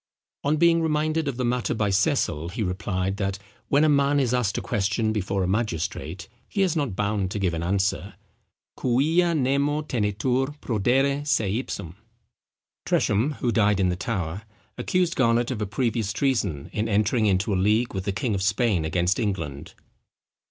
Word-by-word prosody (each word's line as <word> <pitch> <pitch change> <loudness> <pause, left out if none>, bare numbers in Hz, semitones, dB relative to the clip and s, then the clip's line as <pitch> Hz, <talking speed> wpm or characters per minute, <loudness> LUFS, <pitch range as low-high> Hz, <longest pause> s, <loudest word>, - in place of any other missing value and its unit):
On 150 +2 +1
being 170 +1 +4
reminded 155 0 0
of 135 -4 -2
the 125 - -1
matter 120 0 0
by 105 -2 0
Cecil, 95 - +1
he 110 +5 -3
replied, 95 0 -2
that 100 -1 -2 0.3
when 145 +2 +3
a - - +5
man 140 -1 +3
is 125 -3 +1
asked 125 -5 0
a - - +1
question 105 +2 0
before 100 -2 -1
a - - 0
magistrate 90 -5 -2 0.2
he 195 - +1
is 180 -4 +1
not 140 - -1
bound 100 -1 -1
to 100 - -4
give 95 -4 0
an 80 - -2
answer 95 +2 -1 0.6
quia 160 +8 +2
nemo 140 +2 +1
tenetur 130 +4 -1
prodere 135 +6 +1
seipsum. 110 - -2 0.9
Tresham, 115 +9 +1
who 120 - +1
died 105 -3 +2
in 95 -1 +2
the 90 - 0
Tower, 95 -4 -3 0.3
accused 180 -3 0
Garnet 120 0 +2
of 115 -4 -3
a 105 - -1
previous 110 -1 -1
treason 105 - -1
in 110 +2 -1
entering 105 +2 +2
into 100 +2 +1
a - - +1
league 105 +6 +2
with 95 -1 -4
the 100 - 0
king 105 +4 -1
of 95 - -1
Spain 100 -2 +1
against 90 +4 0
England. 95 -10 -3
110 Hz, 170 wpm, -25 LUFS, 95-135 Hz, 0.9 s, a